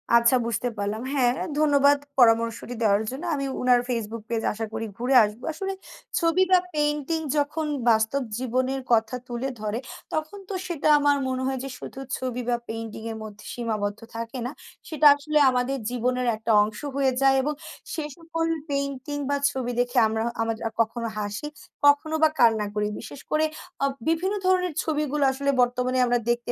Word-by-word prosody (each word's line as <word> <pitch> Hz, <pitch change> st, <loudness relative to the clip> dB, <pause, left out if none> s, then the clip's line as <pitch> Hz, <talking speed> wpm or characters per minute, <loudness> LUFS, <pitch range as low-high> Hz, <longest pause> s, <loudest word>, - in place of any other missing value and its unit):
আচ্ছা 235 Hz, +2 st, +5 dB
বুঝতে 235 Hz, +1 st, -1 dB
পারলাম। 205 Hz, +2 st, -2 dB
হ্যাঁ, 250 Hz, -4 st, +3 dB, 0.3 s
ধন্যবাদ 285 Hz, -1 st, +5 dB, 0.2 s
পরামর্শটি 230 Hz, 0 st, +3 dB
দেওয়ার 205 Hz, 0 st, +3 dB
জন্য। 265 Hz, +6 st, -6 dB
আমি 275 Hz, -1 st, -2 dB, 0.2 s
উনার 250 Hz, -1 st, +4 dB
FaceBook 230 Hz, -2 st, -3 dB
পেজ 230 Hz, -1 st, -1 dB
আশা 225 Hz, +1 st, -3 dB
করি 225 Hz, 0 st, -3 dB
ঘুরে 250 Hz, +3 st, +1 dB
আসবো। 210 Hz, +3 st, -4 dB
আসলে 385 Hz, +5 st, -3 dB, 0.5 s
ছবি 335 Hz, +2 st, +3 dB
বা 370 Hz, -, +7 dB, 0.2 s
পেইন্টিং 295 Hz, +1 st, 0 dB, 0.2 s
যখন 295 Hz, +2 st, 0 dB, 0.2 s
বাস্তব 220 Hz, +5 st, +2 dB, 0.2 s
জীবনের 255 Hz, +2 st, -1 dB
কথা 225 Hz, +1 st, +3 dB
তুলে 245 Hz, +2 st, -3 dB
ধরে, 215 Hz, +2 st, -2 dB, 0.3 s
তখন 315 Hz, +6 st, -3 dB
তো -, -, -3 dB
সেটা 330 Hz, -4 st, -1 dB
আমার 290 Hz, 0 st, +3 dB
মনে 260 Hz, 0 st, -2 dB
হয় 265 Hz, -1 st, -1 dB
যে, 270 Hz, -, -5 dB
শুধু -, -, -8 dB, 0.2 s
ছবি 250 Hz, -1 st, -3 dB
বা 240 Hz, -, +3 dB
পেইন্টিং 225 Hz, -1 st, -5 dB
এর 220 Hz, -, -6 dB
মধ্যে 210 Hz, -1 st, -10 dB
সীমাবদ্ধ 215 Hz, -3 st, -2 dB, 0.2 s
থাকে 230 Hz, +3 st, -5 dB
না। 250 Hz, -, -3 dB, 0.4 s
সেটা 310 Hz, -1 st, 0 dB
আসলে 300 Hz, +1 st, -1 dB
আমাদের 255 Hz, +2 st, 0 dB
জীবনের 250 Hz, +1 st, 0 dB
একটা 220 Hz, +1 st, -2 dB
অংশ 210 Hz, 0 st, -5 dB, 0.2 s
হয়ে 275 Hz, -1 st, +2 dB
যায় 270 Hz, 0 st, +5 dB
এবং 295 Hz, +3 st, -1 dB, 0.4 s
সে 315 Hz, -, -2 dB
সকল 330 Hz, 0 st, -2 dB, 0.2 s
পেইন্টিং 280 Hz, 0 st, -2 dB
বা 285 Hz, -, +2 dB, 0.2 s
ছবি 255 Hz, -3 st, -3 dB
দেখে 245 Hz, 0 st, 0 dB
আমরা 220 Hz, +1 st, -1 dB, 0.2 s
আমরা 225 Hz, 0 st, 0 dB, 0.3 s
কখনো 230 Hz, +1 st, -1 dB
হাসি, 210 Hz, +6 st, -3 dB, 0.4 s
কখনো 290 Hz, +2 st, +4 dB
বা 315 Hz, -, +7 dB
কান্না 225 Hz, -3 st, +4 dB
করি 210 Hz, 0 st, +1 dB
বিশেষ 240 Hz, +5 st, -9 dB
করে 310 Hz, +1 st, +3 dB, 0.4 s
আ -, -, +5 dB, 0.2 s
বিভিন্ন 335 Hz, +5 st, +1 dB
ধরনের 365 Hz, -2 st, +2 dB
ছবিগুলো 300 Hz, -2 st, 0 dB
আসলে 280 Hz, +1 st, -2 dB
বর্তমানে 250 Hz, +1 st, +1 dB
আমরা 245 Hz, 0 st, +2 dB
দেখতে 240 Hz, 0 st, 0 dB
255 Hz, 170 wpm, -25 LUFS, 230-290 Hz, 0.5 s, বা